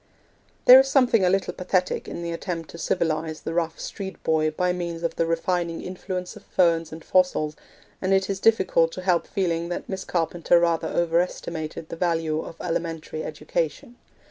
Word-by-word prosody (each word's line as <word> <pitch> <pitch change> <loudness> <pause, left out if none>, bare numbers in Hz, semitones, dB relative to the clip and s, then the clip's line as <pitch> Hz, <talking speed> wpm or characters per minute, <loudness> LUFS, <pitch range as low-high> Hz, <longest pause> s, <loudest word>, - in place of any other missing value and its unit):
There 255 +1 +11
is 270 - +3
something 250 -6 +4
a 180 - +4
little 195 0 0
pathetic 180 0 -1
in 170 - -6
the 170 - -3
attempt 165 -1 -5
to 170 - -10
civilise 160 -2 -1
the 165 - -3
rough 165 -1 -1
street 190 -1 -7
boy 155 -1 +2
by 180 +3 0
means 170 -1 -4
of 165 -1 -1
the 165 - 0
refining 170 0 -1
influence 180 0 -5
of - - -11
ferns 165 -3 +2
and 160 0 -9
fossils, 180 -5 +2 0.5
and 190 - 0
it 190 -1 +3
is 195 -1 -2
difficult 190 -7 +3
to 185 - -6
help 180 -2 +2
feeling 170 -3 -1
that 175 - -4
Miss 190 -1 -4
Carpenter 170 0 +2
rather 170 -1 +1
overestimated 165 -2 -1
the - - -5
value 165 -3 0
of 165 - -10
elementary 165 -2 -3
education. 155 - -3
170 Hz, 175 wpm, -25 LUFS, 165-185 Hz, 0.5 s, There